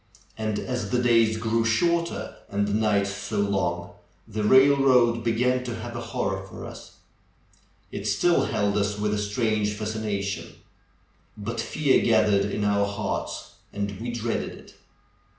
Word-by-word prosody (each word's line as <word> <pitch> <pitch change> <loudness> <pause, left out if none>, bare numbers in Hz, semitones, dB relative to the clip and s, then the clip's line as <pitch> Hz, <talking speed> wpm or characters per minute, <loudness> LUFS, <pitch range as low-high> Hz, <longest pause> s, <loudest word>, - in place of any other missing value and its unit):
And 110 -1 -2
as 125 -4 -3
the 125 - +1
days 115 -2 +3
grew 115 +1 +1
shorter, 170 +10 0
and 100 0 0
the 100 - -1
nights 105 -2 +2
so 105 +2 -5
long, 90 -3 -1 0.4
the 110 -1 -3
railroad 130 -1 +5
began 125 +2 +1
to 120 -2 -4
have 120 +1 -7
a 120 - -4
horror 105 -6 -2
for - - -9
us. - - -10 1.0
It - - -4
still 175 -1 +3
held 100 0 0
us 105 +1 -1
with 105 0 0
a 105 - 0
strange 105 0 0
fascination; 105 -2 -3 0.8
but 115 +2 -3
fear 145 0 +2
gathered 105 -3 +3
in 105 +1 -2
our 100 0 +2
hearts, 100 0 -4 0.2
and 100 0 -3
we 120 - -3
dreaded 120 -1 -2
it. - - -15
110 Hz, 150 wpm, -25 LUFS, 100-120 Hz, 1.0 s, railroad